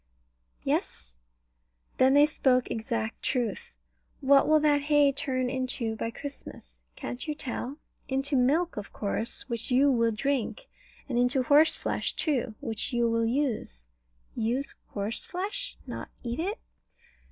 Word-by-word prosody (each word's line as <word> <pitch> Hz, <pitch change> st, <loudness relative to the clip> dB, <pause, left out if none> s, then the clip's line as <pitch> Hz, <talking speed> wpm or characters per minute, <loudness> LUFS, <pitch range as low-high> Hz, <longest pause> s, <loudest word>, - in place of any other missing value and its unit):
Yes. -, -, -2 dB, 0.8 s
Then 260 Hz, +1 st, +6 dB
they 290 Hz, +1 st, +8 dB
spoke 260 Hz, -4 st, +2 dB
exact 225 Hz, 0 st, -3 dB
truth. 240 Hz, -6 st, -1 dB, 0.5 s
What 275 Hz, 0 st, +5 dB
will 310 Hz, 0 st, +6 dB
that 295 Hz, -1 st, +4 dB
hay 290 Hz, -1 st, +4 dB
turn 265 Hz, -3 st, -1 dB
into 250 Hz, -3 st, -2 dB
by 230 Hz, -, -2 dB
Christmas? 230 Hz, -, -9 dB, 0.2 s
Can't 250 Hz, +5 st, -6 dB
you 300 Hz, -, -2 dB
tell? 265 Hz, 0 st, -5 dB, 0.3 s
Into 270 Hz, +2 st, 0 dB
milk, 290 Hz, +7 st, +2 dB
of 205 Hz, -, -5 dB
course, 220 Hz, +2 st, -1 dB
which 235 Hz, -1 st, -4 dB
you 270 Hz, +3 st, +5 dB
will 230 Hz, -2 st, +3 dB
drink; 275 Hz, -, -1 dB, 0.4 s
and 245 Hz, -3 st, 0 dB
into 250 Hz, +2 st, +2 dB
horseflesh 295 Hz, +4 st, +3 dB
too, 255 Hz, -8 st, -1 dB
which 225 Hz, -4 st, -3 dB
you 240 Hz, -1 st, +2 dB
will 230 Hz, 0 st, +2 dB
use. 225 Hz, -, -1 dB, 0.5 s
Use 240 Hz, +5 st, -1 dB
horseflesh? 375 Hz, -, -4 dB
Not -, -, -6 dB
eat 240 Hz, +2 st, -3 dB
it? 395 Hz, +7 st, -1 dB
255 Hz, 130 wpm, -28 LUFS, 230-285 Hz, 0.8 s, they